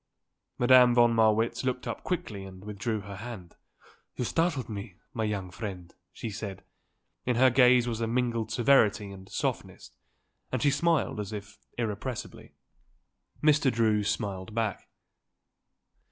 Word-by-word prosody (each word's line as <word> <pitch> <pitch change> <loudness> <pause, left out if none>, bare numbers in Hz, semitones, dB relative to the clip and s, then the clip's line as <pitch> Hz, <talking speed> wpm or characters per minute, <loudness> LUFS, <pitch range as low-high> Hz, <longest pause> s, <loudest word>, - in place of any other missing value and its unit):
Madame 125 -1 +6
von 120 -1 +5
Marwitz 110 +1 +2
looked 125 -1 -2
up - - -5
quickly 110 - -3
and 95 0 -11
withdrew 105 +1 -3
her 100 -1 -8
hand. 105 -6 -8 0.6
"You 125 - -2
startled 165 -2 0
me, 100 -3 -7 0.2
my 110 - -2
young 100 -4 -3
friend," 95 -4 -7 0.2
she 115 - -6
said. 100 -2 -6 0.6
In 125 - 0
her 130 +2 +5
gaze 125 -1 +5
was 115 -1 -3
a 115 - 0
mingled 115 -2 -1
severity 110 -5 +3
and 95 -1 -12
softness - - -4 0.6
and 130 - 0
she 145 +4 +3
smiled 155 -4 +1
as 105 -1 -4
if 105 -1 -8 0.2
irrepressibly. 115 +1 -5 0.9
Mr. 150 -3 +4
Drew 110 -3 +2
smiled 105 -1 -3
back. 110 -4 -2
115 Hz, 140 wpm, -28 LUFS, 100-125 Hz, 0.9 s, Madame